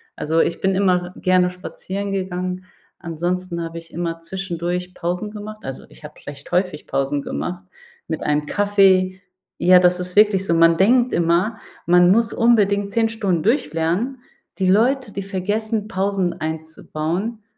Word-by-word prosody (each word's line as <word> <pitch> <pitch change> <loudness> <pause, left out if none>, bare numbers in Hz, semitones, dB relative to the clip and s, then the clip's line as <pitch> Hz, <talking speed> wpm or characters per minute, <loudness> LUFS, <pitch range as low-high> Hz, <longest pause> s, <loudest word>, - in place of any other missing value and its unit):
Also, 160 +2 0
ich 170 - -1
bin 190 0 +1
immer 180 -2 +1
gerne 185 -1 +3
spazieren 195 +2 -6
gegangen. 185 -1 -3 0.4
Ansonsten 175 +1 -3
habe 165 0 -6
ich 165 0 -11
immer 165 0 -3
zwischendurch 180 0 -4
Pausen 180 +5 -3
gemacht- 215 0 -8
also, 135 - -7
ich - - -19
habe 150 0 -10
vielleicht 145 0 -11
häufig 180 -3 -1
Pausen 135 +1 -1
gemacht- 180 +6 -5 0.4
mit 160 -1 -4
einem 150 0 0
Kaffee. 190 -1 +3 0.4
Ja, 180 +1 +6
das 180 0 +3
ist 180 0 -7
wirklich 205 -3 +5
so. 170 - +1
Man 165 0 +5
denkt 240 +6 +3
immer, 175 +7 +1 0.3
man 180 +1 +5
muss 230 +2 +2
unbedingt 205 -4 +2
10 225 +1 +2
Stunden 195 -7 -1
durchlernen. 220 - 0 0.4
Die 190 -2 +1
Leute, 235 +3 +2
die 200 - -4
vergessen, 210 +3 -2
Pausen 190 -3 -1
einzubauen, 160 +6 -4
185 Hz, 150 wpm, -21 LUFS, 170-205 Hz, 0.4 s, Ja